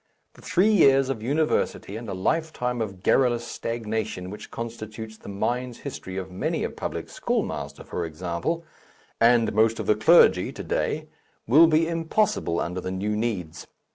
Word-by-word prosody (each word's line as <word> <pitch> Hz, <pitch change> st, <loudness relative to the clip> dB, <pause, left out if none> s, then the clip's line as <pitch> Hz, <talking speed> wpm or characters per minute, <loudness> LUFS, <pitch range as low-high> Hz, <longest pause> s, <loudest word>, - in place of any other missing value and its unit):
The -, -, -17 dB
three 195 Hz, +5 st, +3 dB
years 135 Hz, -8 st, +5 dB
of 120 Hz, -5 st, -2 dB
university 140 Hz, -5 st, 0 dB
and 115 Hz, 0 st, -6 dB
a -, -, -3 dB
lifetime 125 Hz, -, -1 dB
of 95 Hz, -4 st, -5 dB
garrulous 120 Hz, -3 st, +3 dB
stagnation 110 Hz, -6 st, -4 dB
which 105 Hz, -, -9 dB
constitutes 110 Hz, -1 st, -7 dB
the 110 Hz, -, -12 dB
mind's 120 Hz, +5 st, -2 dB
history 95 Hz, -9 st, -6 dB
of 95 Hz, -1 st, -5 dB
many 90 Hz, -, -2 dB
a -, -, -2 dB
public -, -, -5 dB
schoolmaster, -, -, -3 dB
for 85 Hz, -, -4 dB
example, 85 Hz, -, -3 dB, 0.6 s
and 115 Hz, 0 st, +4 dB
most 110 Hz, +1 st, +3 dB
of -, -, -3 dB
the -, -, +4 dB
clergy 110 Hz, -, +5 dB
to -, -, -7 dB
day, -, -, -2 dB, 0.4 s
will 155 Hz, +8 st, +7 dB
be 160 Hz, +1 st, +3 dB
impossible 165 Hz, -, 0 dB
under 90 Hz, +2 st, -3 dB
the 95 Hz, -, -4 dB
new 100 Hz, +3 st, -2 dB
needs. 105 Hz, -8 st, -3 dB
115 Hz, 160 wpm, -25 LUFS, 95-135 Hz, 0.6 s, will